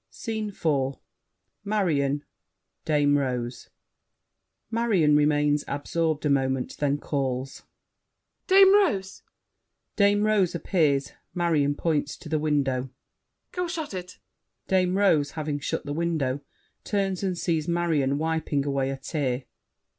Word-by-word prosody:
SCENE 220 -2 -4
IV 140 -8 -1 0.7
Marion, 150 -9 0 0.6
Dame 145 -2 +3
Rose 125 -2 -3 1.0
MARION 205 -10 +3
(remains 150 0 +2
absorbed 155 +2 -1
a - - +2
moment, 135 -2 0
then 145 -1 +1
calls). 135 -2 -3 0.9
Dame 385 0 +7
Rose! 205 - +1 0.7
[Dame 205 0 +3
Rose 200 -5 +2
appears. 150 -5 +1 0.2
Marion 155 -5 +1
points 150 -2 -1
to 155 - -11
the 155 0 +1
window. 135 -4 0 0.6
Go 360 -1 -2
shut 320 - -4
it! 185 0 -7 0.5
[Dame 185 0 +2
Rose, 160 -8 +3
having 150 -2 -2
shut 145 - -3
the 145 - -3
window, 155 -5 -1 0.4
turns 195 -3 -1
and 185 -3 -1
sees 165 -3 -1
Marion 160 -6 +1
wiping 155 -2 -1
away 135 -1 0
a 135 - -3
tear. 135 -3 -2
155 Hz, 115 wpm, -26 LUFS, 140-185 Hz, 1.0 s, Dame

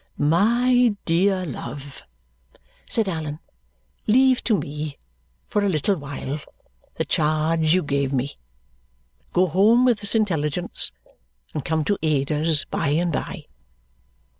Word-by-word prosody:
"My 235 +9 +3
dear 185 +2 +2
love," 140 -1 -7 0.9
said 225 -3 +2
Allan, 155 -4 -3 0.7
"leave 255 +3 +4
to 220 -4 +3
me, 150 -2 -5 0.5
for 210 - 0
a 200 - +2
little 180 +4 +1
while, 145 -1 -5 0.6
the - - -2
charge 155 +1 +2
you 185 - +1
gave 140 -2 -1
me. 135 - -2 0.9
Go 180 - +3
home 210 - +4
with 240 -4 +3
this 205 +2 -3
intelligence 175 -6 +1 0.6
and 150 - -3
come 160 -1 0
to 205 +5 0
Ada's 150 0 +1
by - - -2
and 165 +4 +1
by!" - - -4
165 Hz, 120 wpm, -23 LUFS, 150-205 Hz, 0.9 s, leave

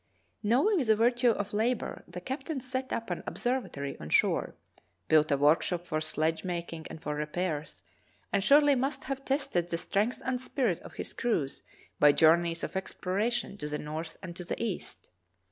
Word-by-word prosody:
Knowing 275 - +3
the 220 -4 +4
virtue 240 +2 +3
of 205 -2 -1
labor, 230 +3 -1
the 175 +1 -7
captain 265 - -4
set 260 0 -4
up 230 0 -3
an - - -2
observatory 240 - -2
on 75 - -7
shore, - - +2 0.5
built 155 -1 +5
a 140 - +3
workshop 165 +4 +3
for 155 -2 -1
sledge 155 +1 0
making 170 -3 -4
and 160 - -9
for 150 - -2
repairs, 150 0 -3 0.5
and 195 - +2
surely 290 +4 +6
must 270 +2 -1
have 270 0 -4
tested 265 - 0
the 170 - -1
strength 210 +8 0
and 255 -1 -1
spirit 245 - 0
of - - -12
his - - -5
crews 160 - -1 0.4
by 145 - +8
journeys 165 +2 +4
of - - -3
explora 190 +3 -1
tion 235 -4 -3
to 150 - -3
the 150 - -2
north 155 +2 -5
and 175 -2 -7
to 180 - -6
the 175 - -4
east. 220 -6 -5
190 Hz, 180 wpm, -30 LUFS, 160-245 Hz, 0.5 s, by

